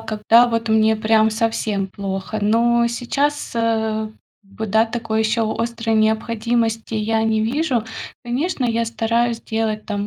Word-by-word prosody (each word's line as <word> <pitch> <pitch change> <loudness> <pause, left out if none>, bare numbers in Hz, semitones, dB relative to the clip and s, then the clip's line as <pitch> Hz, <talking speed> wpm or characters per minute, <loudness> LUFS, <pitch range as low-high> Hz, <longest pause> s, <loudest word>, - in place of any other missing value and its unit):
когда 225 +2 +3
вот 230 -1 -2
мне 220 0 +3
прям 220 0 +3
совсем 215 -3 -1
плохо. 195 +2 -4
Но 235 +2 +3
сейчас, 280 +5 -1
э, 220 -1 0 0.3
б 215 +3 -7
да, 220 +2 +3
такой 225 -1 -2
ещё 220 0 +1
острой 230 0 -2
необходимости 225 +1 0
я 220 +1 0
не 220 -1 +1
вижу. 245 +1 0 0.4
Конечно, 255 +3 -1
я 230 0 0
стараюсь 230 +1 0
делать 220 -1 -2
там 205 -1 -3
225 Hz, 135 wpm, -20 LUFS, 220-235 Hz, 0.4 s, когда